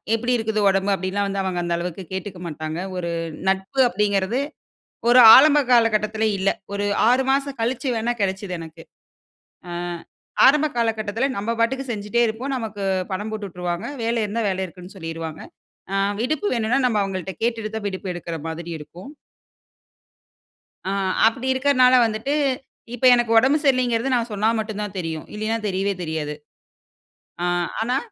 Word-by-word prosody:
எப்டி 245 +2 -1
இருக்குது 220 -1 -1
உடம்பு? 195 +1 +1
அப்டிலாம் 195 +2 -2
வந்து 195 0 -2
அவங்க 185 -2 -2
அந்த 170 0 -1
அளவுக்கு 180 +2 -5
கேட்டுக்க 190 -1 -5
மாட்டாங்க. 155 +1 -5 0.2
ஒரு 170 -1 -3 0.4
நட்பு 190 +7 -2
அப்டிங்கிறது 200 +4 0 0.7
ஒரு 250 - +7 0.2
ஆரம்ப 295 +2 +7
காலகட்டத்துல 220 -2 +3
இல்ல. 195 +1 +1 0.2
ஒரு 205 0 -1 0.2
6 260 +2 +3
மாசம் 275 -1 -1
கழிச்சு 255 +3 -1
வேணா 230 +2 0
கெடைச்சது 190 -1 -2
எனக்கு. 160 -1 -10 0.9
ஆ - - -7 0.8
ஆரம்ப 300 +3 +5
காலகட்டத்துல 225 +1 0
நம்ம 230 +3 -1
பாட்டுக்கு 265 +2 0
செஞ்சுட்டே 210 +3 0
இருப்போம். 250 +5 -3
நமக்கு 215 -4 -5 0.3
பணம் 210 +3 -3
போட்டு 210 -2 -4
விட்ருவாங்க. 180 +3 -4 0.2
வேலை 230 0 0
இருந்தா 220 +3 -2
வேலை 190 0 -1
இருக்குன்னு 180 +2 -13
சொல்லிருவாங்க. 165 -2 -6 0.5
அ - - 0 0.3
விடுப்பு 310 +11 -1
வேணுன்னா 230 +3 +1
நம்ம 220 -4 +1
அவங்கள்ட்ட 190 -1 -4
கேட்டுட்டு 230 -2 -1
தான் 215 - -5
விடுப்பு 190 0 -5
எடுக்குற 170 -1 -5
மாதிரி 170 +1 -6
இருக்கும். 170 - -11 1.8
ஆ. - - -1 0.3
அப்டி 255 +3 0
இருக்கனால 255 -1 +4
வந்துட்டு, 225 +6 -2 0.6
இப்ப 245 +1 -5
எனக்கு 240 -1 +1
உடம்பு 270 +6 +4
சரியில்லைங்கிறது, 255 -1 +2
நான் 235 -1 -2
சொன்னா 210 +2 +1
மட்டுந்தான் 210 -2 -4
தெரியும். 160 -3 -4
இல்லைனா, 215 +2 -1
தெரியவே 195 +1 -1
தெரியாது. 155 -2 -3 1.1
ஆ, - - +1 0.4
ஆனா. 245 +3 +1
215 Hz, 145 wpm, -22 LUFS, 190-240 Hz, 1.8 s, ஒரு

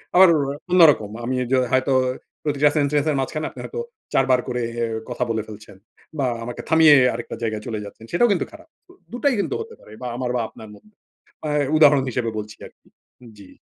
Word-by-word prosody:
আমার 190 +1 +9
ওরো 140 -2 0 0.2
অন্যরকম। 150 - +5
আমি 130 +2 -1 0.2
যে 130 - +4 0.2
হয়তো 130 +1 +2 0.5
প্রতিটা 150 -1 +2
সেন্টেন্সের 145 +1 +1
মাঝখানে 155 +3 -3
আপনি - - -13
হয়তো, 470 - -5 0.3
৪ 135 - +3
বার 125 - +4
করে 125 -1 -2 0.5
কথা 125 0 -2
বলে 110 -1 -1
ফেলছেন 105 -2 -12 0.4
বা 135 - +1 0.2
আমাকে 120 +1 -6
থামিয়ে 160 -2 +7 0.2
আরেকটা 120 +1 -6
জায়গায় 110 -2 -2
চলে 110 -2 -3
যাচ্ছেন, 110 +2 -12
সেটাও 240 +8 +3
কিন্তু 195 - +1
খারাপ। 320 +1 -14 0.2
দু - - -17 0.2
দুটাই 275 +3 +1
কিন্তু 415 - -1
হতে 455 0 -9
পারে - - -17
বা 125 - -4
আমার 125 -1 -2
বা 120 - +1
আপনার 110 -1 -13
মধ্যে। 215 - -22 0.5
আ - - -2 0.3
উদাহরণ 145 -3 +6
হিসেবে 120 -1 -2
বলছি 105 0 -8
আরকি। - - -26 0.5
জি। 100 -2 -14
135 Hz, 190 wpm, -22 LUFS, 115-160 Hz, 0.5 s, আমার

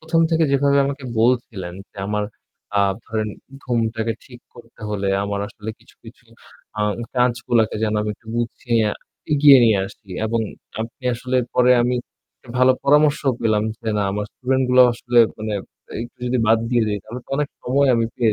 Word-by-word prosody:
১ম 160 +1 +1
থেকে 165 0 +3
যেভাবে 140 0 +3
আমাকে 140 0 -5 0.2
বলছিলেন 115 -7 0 0.2
যে, - - -28
আমার 105 0 0 0.5
আ 100 - +5 0.2
ধরেন 110 -1 -2 0.4
ঘুমটাকে 115 -2 -1
ঠিক 120 -2 -14
করতে 115 -1 -16
হলে, 100 -2 -2 0.2
আমার 100 0 -2
আসলে 110 +1 -7
কিছু, - - -22
কিছু - - -14 0.5
আ - - 0 0.3
কাজগুলাকে 120 -3 +1
যেন 110 -1 +1
আমি 105 0 -2
একটু 110 - -30
গুছিয়ে, 115 -1 0 0.5
এগিয়ে 145 -2 +8
নিয়ে 110 -3 +4
আসি 100 0 -16 0.2
এবং 115 +1 0 0.4
আপনি 115 +3 -7
আসলে 125 +2 -2 0.2
পরে 125 0 +5
আমি 125 +1 +1 0.4
একটা - - -23
ভালো 130 0 +6
পরামর্শ 150 +1 +4 0.2
পেলাম 110 -2 +2 0.2
যে, - - -3
না - - +1
আমার 105 +1 -2
student 130 +1 0
গুলাও 125 0 +7
আসলে 120 +1 0 0.2
মানে 110 0 -3 0.5
একটু 120 - -15
যদি 125 +1 0
বাদ 110 +1 +5
দিয়ে 120 -2 +3
দেই 105 -1 -1
তাহলে 115 +4 -7
তো - - -28
অনেক 145 0 0
সময় 140 +2 +2
আমি 115 - +2
পেয়ে 115 -3 +2
120 Hz, 175 wpm, -21 LUFS, 110-130 Hz, 0.5 s, এগিয়ে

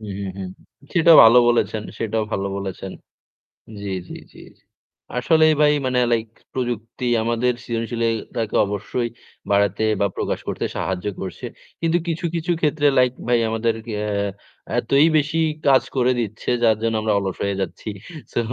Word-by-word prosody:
হু, 110 - -10
হু, 100 - -4
হুম। 95 -1 -5 0.4
সেটাও 170 -2 +7
ভালো 115 +2 +8
বলেছেন, 110 -2 +1 0.2
সেটাও 110 -1 -1
ভালো 100 0 -1
বলেছেন। 95 -1 -5 0.9
জ্বি, 100 -1 -4 0.2
জ্বি, - - -8 0.2
জ্বি। - - -13 0.8
আসলে 160 +5 +4 0.2
ভাই 150 0 +5
মানে 125 -1 +1
লাইক 115 -1 +1 0.3
প্রযুক্তি 120 -1 -4 0.2
আমাদের 120 +2 +1
সৃজনশীল 115 0 -3 0.3
তাকে 110 -2 -2
অবশ্যই 105 +4 -3 0.4
বাড়াতে 100 +1 +2 0.2
বা 100 - +4
প্রকাশ - - -2
করতে - - -2
সাহায্য 95 +1 -3 0.2
করছে। 95 -2 -6 0.4
কিন্তু 165 +1 +2
কিছু, 165 +1 -2
কিছু 170 +1 -1
ক্ষেত্রে 150 -1 +2
লাইক 125 -1 +4 0.2
ভাই 120 -1 +3
আমাদেরকে 115 0 -2 0.2
এ - - -2 0.7
এতই 140 +6 +4
বেশি 155 +2 0 0.3
কাজ 135 -1 +5
করে 130 0 +3
দিচ্ছে 110 -2 -4
যার 110 -2 +4
জন্য 115 -1 0
আমরা 110 -1 +1
অলস 95 -2 -4
হয়ে 100 -1 -1
যাচ্ছি। 95 +4 -5 0.4
সো - - +1
115 Hz, 150 wpm, -21 LUFS, 105-130 Hz, 0.9 s, ভালো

